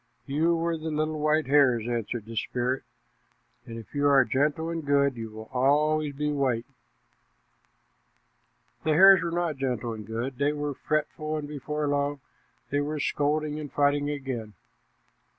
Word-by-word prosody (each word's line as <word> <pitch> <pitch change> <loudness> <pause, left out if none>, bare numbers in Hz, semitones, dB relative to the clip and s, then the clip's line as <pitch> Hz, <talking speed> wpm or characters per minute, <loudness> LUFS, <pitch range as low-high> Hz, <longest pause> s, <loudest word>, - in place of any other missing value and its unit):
"You 155 +4 +1
were 165 0 -1
the 160 +1 -4
little 155 0 -1
white 155 +1 +2
hares," 130 -5 +3
answered 120 -2 -3
the 115 0 -9
spirit, 125 +4 -1 0.9
"and 115 - -7
if 115 - -11
you 145 0 +2
are 135 -2 +5
gentle 150 +5 0
and 165 -1 -3
good, 140 -1 +2
you 115 -1 -6
will 110 0 -10
always 145 +3 +2
be 150 +1 -1
white." 130 -5 0 2.2
The 155 - +2
hares 190 +3 +8
were 170 - -1
not 170 -3 -1
gentle 125 -4 -2
and 110 -1 -7
good; 120 +3 -4
they 145 +1 +2
were 145 -1 -3
fretful, 155 +2 -2
and 150 -1 -5
before 150 +1 -3
long 145 0 0 0.5
they 145 - +1
were 150 +1 -3
scolding 150 +2 0
and 150 -2 -7
fighting 145 0 +2
again. 130 -7 -4
145 Hz, 155 wpm, -27 LUFS, 130-155 Hz, 2.2 s, hares